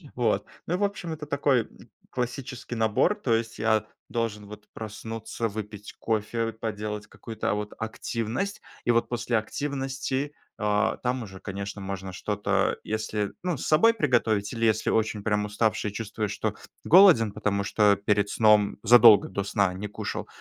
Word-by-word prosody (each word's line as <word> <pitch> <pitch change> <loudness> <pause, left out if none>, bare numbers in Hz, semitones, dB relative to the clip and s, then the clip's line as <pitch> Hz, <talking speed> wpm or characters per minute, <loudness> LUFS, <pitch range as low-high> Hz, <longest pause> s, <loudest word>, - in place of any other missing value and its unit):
Вот. - - +1 0.2
Ну, 175 +2 -1
в 205 - -1
общем, 185 -4 -4
это 150 -1 -6
такой 140 -5 +1 0.4
классический 125 0 -4
набор. 110 - +2
То 130 - -1
есть 115 0 -1
я 110 -1 +2 0.2
должен 110 -3 -3
вот 105 0 -11
проснуться, 110 +1 -5
выпить 105 -1 -7
кофе, 115 +1 -1
поделать 105 -1 -4
какую-то, 110 -1 -4
а, - - +2
вот 105 0 -4
активность. 115 - -3 0.2
И 120 - +4
вот 115 0 +2
после 120 -1 0
активности, 135 +3 -3 0.2
а, 105 +1 +1
там 125 0 -1
уже, 95 -3 -10
конечно, 100 +1 -6
можно 95 -1 -5
что-то 105 +2 0
если, 105 -1 -2
ну, 180 -2 0
с - - -5
собой 225 +10 +5
приготовить, 115 - +1
или 115 -1 0
если 110 -1 +2
очень 110 -1 0
прям 105 0 +1
уставший, 105 0 0
чувствуешь, 105 -1 -3
что 105 0 -2 0.3
голоден, 165 - +7
потому 100 -1 -1
что 105 0 +4
перед 100 0 +1
сном 105 -2 +4
задолго 115 -3 +8
до 100 +1 -2
сна 100 -1 +1
не 100 +3 -4
кушал, 105 - -5
110 Hz, 155 wpm, -26 LUFS, 105-120 Hz, 0.4 s, задолго